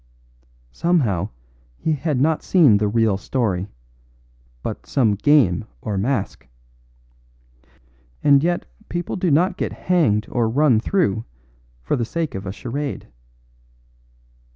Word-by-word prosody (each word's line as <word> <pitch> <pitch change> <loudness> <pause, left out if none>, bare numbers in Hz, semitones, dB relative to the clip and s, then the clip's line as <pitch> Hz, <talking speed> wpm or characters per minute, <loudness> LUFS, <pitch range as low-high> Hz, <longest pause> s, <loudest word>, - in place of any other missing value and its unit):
Somehow 115 - 0 0.5
he 160 - -1
had 150 -2 -1
not 155 +3 +2
seen 155 - +5
the 105 +1 0
real 110 -2 +2
story, 100 -2 -1 1.0
but - - -6
some 115 -6 +2
game 110 - +3 0.2
or 105 -3 -4
masque. 100 +2 -2 1.8
And 140 -1 +5
yet 175 +1 0 0.2
people 175 0 -3
do 185 -2 0
not 175 +7 +2
get - - -2
hanged 145 - +1
or 120 -2 +1
run 130 -2 +3
through 185 - +1
the 95 - -3
body 110 - -7 0.6
for - - 0
the 120 - -1
sake 165 +5 -3
of 95 0 -6
a - - -3
charade. 135 +7 -5
130 Hz, 130 wpm, -21 LUFS, 105-160 Hz, 1.8 s, seen